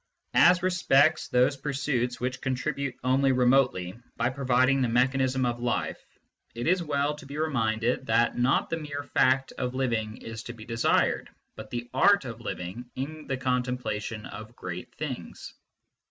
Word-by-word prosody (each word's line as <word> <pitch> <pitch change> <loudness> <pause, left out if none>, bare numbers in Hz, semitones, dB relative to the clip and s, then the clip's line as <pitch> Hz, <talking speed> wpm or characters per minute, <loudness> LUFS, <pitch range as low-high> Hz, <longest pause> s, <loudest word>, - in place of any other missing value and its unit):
As 180 +1 +6
respects 160 -6 +3
those 125 +3 +3
pursuits 135 -3 -1
which 125 +1 -3
contribute 130 0 -2
only 135 +1 +3
remotely, 125 -8 +2 0.2
by 120 +2 +1
providing 130 0 +2
the 125 - +2
mechanism 130 +2 +2
of 120 -1 -1
life, 120 0 -2 0.5
it 120 +1 -4
is 180 +2 +3
well 145 -2 0
to 150 -2 -11
be 140 +1 -7
reminded 120 -4 0
that 115 +1 +3
not 125 +6 +1
the 165 - 0
mere 145 -2 -5
fact 130 -1 +2
of 125 0 -2
living 115 -4 -1
is 115 -1 -7
to 120 - -6
be 110 -2 -11
desired, 115 -1 +1 0.3
but - - -9
the 120 0 -4
art 200 +5 +4
of 115 -3 -7
living 100 +8 -6
in 150 +4 -6
the 135 - -1
contemplation 125 -4 -2
of 110 +2 -9
great 90 -4 -7
things. 130 - -6
130 Hz, 155 wpm, -27 LUFS, 120-140 Hz, 0.5 s, As